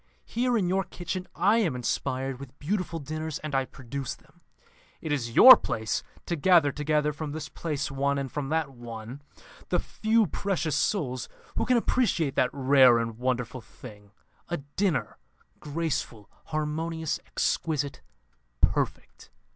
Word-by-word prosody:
Here, 245 0 0
in 190 -5 +1
your 190 +2 +1
kitchen, 180 +1 -5
I 200 +6 +4
am 180 - +1
inspired 130 +1 -2
with 140 0 -11
beautiful 175 +1 -2
dinners, 155 0 -4
and 155 -1 -6
I 135 -1 +2
produce 135 0 -6
them. - - -26 0.6
It 155 - -5
is 120 -5 -2
your 255 - +12
place 110 -1 -2 0.2
to 170 - -1
gather 165 -2 +4
together, 150 +1 0
from 145 0 -5
this 155 -1 -5
place 150 -3 -3
one, 140 +1 0
and 135 -1 -3
from 145 -2 -3
that, 160 -2 0
one, 120 +1 -9 0.5
the - - +2
few 220 0 +1
precious 170 -3 -1
souls 130 - -1 0.3
who - - 0
can 250 -1 +4
appreciate 215 - +1
that 125 - +2
rare 130 -3 +5
and 115 -1 -3
wonderful 125 0 -2
thing, 105 -3 -13 0.4
a 175 - -1
dinner, 155 +6 -2 0.4
graceful, 145 -8 -3
harmonious, 160 +1 -2
exquisite, 145 -3 -1 0.6
perfect.' - - -1
150 Hz, 145 wpm, -27 LUFS, 130-170 Hz, 0.6 s, your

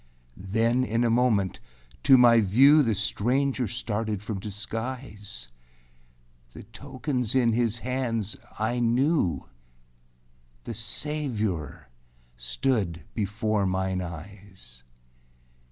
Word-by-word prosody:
â - - -13
7. 95 - -9
Then 115 +3 +2
in 115 -1 0
a 115 - +2
moment 115 -6 +2 0.4
to 130 - +7
my 120 -2 +7
view 135 +9 +6
The 115 -6 +1
stranger 125 +5 0
started 110 -2 -3
from 105 -2 -4
disguise. 105 - -6 1.1
The - - -10
tokens 125 +1 -3
in 120 -3 +3
his 115 -1 +1
hands 115 -4 -2 0.2
I 115 +3 -1
knew; 120 - +1 1.2
The - - -5
Savior 110 - -2 0.5
stood 90 - -1
before 105 -1 -1
mine 95 0 -1
eyes. 90 -7 -10
115 Hz, 105 wpm, -26 LUFS, 100-125 Hz, 1.2 s, to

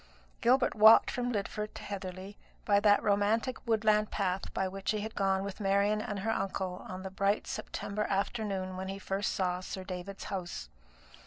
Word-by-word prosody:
Gilbert 250 +2 +4
walked 220 +1 +7
from 245 0 -1
Lidford 210 0 -3
to - - -8
Heatherly 190 0 -6 0.3
by 200 -1 +4
that 205 0 +4
romantic 210 +5 +2
woodland 215 -1 +3
path 190 -1 -2
by 190 - -1
which 195 +1 -5
he 215 -1 +1
had 220 +1 -5
gone 195 -1 +1
with 200 +1 -6
Marian 200 +1 +2
and 205 -2 -4
her 225 +3 0
uncle 190 -2 -2
on 185 0 -6
the 190 - -6
bright 195 +2 +1
September 210 +1 -3
afternoon 195 -2 -2
when 190 0 -4
he 195 +1 -4
first 195 +1 -2
saw 180 -1 0
Sir 185 +1 -6
David's 185 +1 -6
house. 175 - -5
200 Hz, 175 wpm, -31 LUFS, 190-210 Hz, 0.3 s, walked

